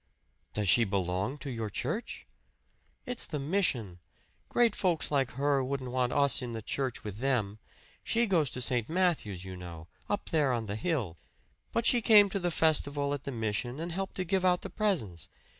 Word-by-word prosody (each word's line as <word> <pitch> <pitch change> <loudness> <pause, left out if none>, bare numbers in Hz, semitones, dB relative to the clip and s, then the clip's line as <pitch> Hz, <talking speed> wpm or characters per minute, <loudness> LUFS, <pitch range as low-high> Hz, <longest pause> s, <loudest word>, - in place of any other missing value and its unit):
"Does 105 -1 0
she 115 +6 +6
belong 95 +4 -1
to 140 -2 -6
your 115 -3 -3
church?" 155 - -4 0.8
"It's 245 -2 -4
the 155 - -3
mission. 135 - 0 0.5
Great 235 -3 +3
folks 175 -6 +1
like 135 -3 +2
her 140 +1 +1
wouldn't 130 -1 -3
want 125 -1 +1
us 140 -1 +2
in 120 -2 -5
the 110 - -4
church 130 0 -2
with 105 -1 -6
them. 115 -6 0 0.4
She 235 +1 +2
goes 170 - +2
to 125 - -4
St. 120 -3 +1
Matthew's, 160 - 0
you 95 0 -7
know 85 -3 -9 0.2
up 205 - -2
there 145 -5 +2
on 115 -2 -2
the 100 -1 -4
hill. 110 - -2 0.5
But 230 - 0
she 240 0 +5
came 210 -2 +7
to 200 - -1
the 175 -1 0
festival 145 -3 +2
at 145 -1 -5
the 140 - -3
mission 115 +3 -2
and 170 +2 -4
helped 190 +3 -4
to 185 - -1
give 185 +1 0
out 180 -1 +3
the - - -6
presents. 125 - -1
135 Hz, 190 wpm, -30 LUFS, 110-175 Hz, 0.8 s, came